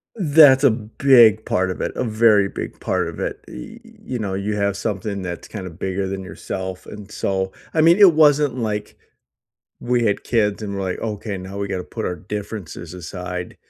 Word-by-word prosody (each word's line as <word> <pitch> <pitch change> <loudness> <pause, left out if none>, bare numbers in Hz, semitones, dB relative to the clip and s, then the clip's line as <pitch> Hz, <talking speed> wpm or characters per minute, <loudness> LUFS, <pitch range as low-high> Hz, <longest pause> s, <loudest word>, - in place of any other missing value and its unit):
That's 145 - +6
a 140 - +6
big 110 0 +4
part 95 0 0
of 90 - -5
it. - - -2
A - - -1
very 110 -3 +3
big - - -7
part - - -1
of - - -8
it. - - -4
Y 230 +1 -10
you 215 - -8
know, 100 -3 -3
you 100 +2 -2
have 100 -1 0
something 100 -1 -3
that's 90 -2 -6
kinda 95 -4 -7
bigger 95 +3 -3
than 95 0 -5
yourself, 95 0 -6
and 105 -1 -10
so 95 -3 -2 0.2
I 160 - +3
mean, 165 +3 +6
it 200 -5 +7
wasn't 145 -4 +4
like 105 -3 -3 0.8
we 120 -1 0
had 105 -2 0
kids 105 -3 +1
and 100 -1 -4
we're, 100 - -3
like, 95 -1 -3
"Okay, 105 -2 -4
now 95 +2 -8
we 100 0 -3
gotta 95 -2 -3
put 110 - -6
our 90 - -3
differences 100 -2 -7
aside, 90 +1 -6
105 Hz, 195 wpm, -21 LUFS, 95-120 Hz, 0.8 s, it